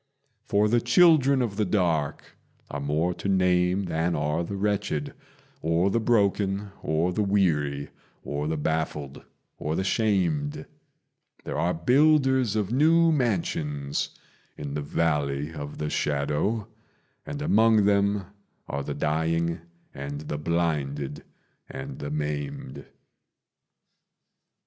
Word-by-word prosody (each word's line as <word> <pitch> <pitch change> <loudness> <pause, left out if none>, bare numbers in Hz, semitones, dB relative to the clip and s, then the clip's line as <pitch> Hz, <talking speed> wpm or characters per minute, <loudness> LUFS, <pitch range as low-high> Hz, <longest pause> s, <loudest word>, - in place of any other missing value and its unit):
For 105 +1 +2
the 120 +2 +2
children 140 0 +5
of 105 -4 -3
the 110 - +2
dark 85 -7 -1 0.4
are 70 - -3
more 75 +5 0
to 95 +3 -4
name 90 0 +2
than 85 -1 -1
are 75 +3 0
the 100 +4 -5
wretched, 95 -7 -1 0.5
Or 85 +4 +2
the 115 - +2
broken, 100 -3 +1
or 80 +3 0
the 105 - 0
weary, 75 -9 +1 0.3
or 75 +1 -3
the 80 0 -1
baffled, 75 -2 -2 0.4
or 75 +1 -2
the 95 - 0
shamed: 90 -9 0 0.8
There - - -5
are 90 +1 +1
builders 130 - +3
of 105 -1 -1
new 165 +5 +4
mansions 80 - -1 0.5
in 70 -1 -5
the 75 - -2
Valley 75 -1 -1
of 75 -2 -7
the 75 0 -3
Shadow, 75 +10 0 0.6
And 145 0 -6
among 110 -6 +4
them 100 -1 +2 0.4
are 70 - -3
the 70 +1 -4
dying 80 +3 0 0.3
and 70 +2 -6
the 75 -1 -4
blinded 75 -4 -1 0.5
and 65 - -7
the 70 - -4
maimed. 75 -2 -4
85 Hz, 120 wpm, -26 LUFS, 75-105 Hz, 0.8 s, children